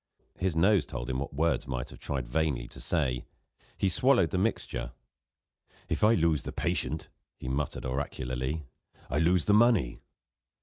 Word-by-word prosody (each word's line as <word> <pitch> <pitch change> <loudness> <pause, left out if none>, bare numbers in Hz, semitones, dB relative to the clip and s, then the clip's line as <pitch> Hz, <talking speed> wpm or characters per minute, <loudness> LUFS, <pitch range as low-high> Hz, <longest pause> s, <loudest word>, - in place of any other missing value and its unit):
His 90 -3 0
nose 90 -2 +4
told - - -4
him 65 - -1
what 70 - -4
words 80 -1 +1
might 65 -2 -3
have - - -12
tried 65 -4 -3
vainly 70 -3 0
to - - -11
say: 60 -2 0 0.5
he 100 - +1
swallowed 120 -1 +4
the - - 0
mixture. 110 +4 -1 1.0
"If - - -1
I 110 +2 +6
lose 80 -4 +2
the - - -5
patient," 80 - -1 0.3
he - - -8
muttered 70 +2 -2
oracularly, 65 +2 -2 0.5
"I 75 - +1
lose 85 +1 +3
the 105 - +4
money." 110 - +4
75 Hz, 160 wpm, -29 LUFS, 65-90 Hz, 1.0 s, I